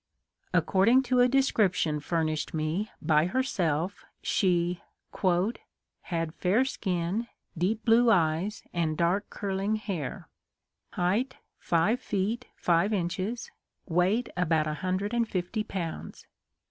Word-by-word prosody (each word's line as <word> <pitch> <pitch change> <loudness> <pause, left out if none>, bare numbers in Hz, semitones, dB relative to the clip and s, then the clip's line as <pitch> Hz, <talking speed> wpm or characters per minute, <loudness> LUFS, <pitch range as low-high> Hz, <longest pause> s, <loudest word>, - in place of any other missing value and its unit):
According 230 +8 +4
to 250 -1 +1
a 245 - +6
description 210 - +2
furnished 155 0 -1
me 160 +7 -1
by 155 +1 +3
herself 180 - -1 0.2
she 175 -2 +1 0.5
" 190 +7 -5
had 165 -3 -3
fair 200 +10 +2
skin, 190 -1 -2 0.3
deep 195 +7 -1
blue 235 +1 +5
eyes, 175 +1 +1
and 160 -3 0
dark 180 +4 +1
curling 200 +1 -1
hair; 190 - -4 0.7
height 210 +9 0 0.2
five 175 +9 +2
feet, 215 +5 -2
five 175 +4 +2
inches; 185 +5 -2 0.3
weight 185 +7 +1
about 165 -3 +2
a 155 - -2
hundred 190 +4 -1
and 235 -2 +1
fifty 185 +4 -2
pounds." 170 -6 -6
185 Hz, 115 wpm, -28 LUFS, 170-220 Hz, 0.7 s, a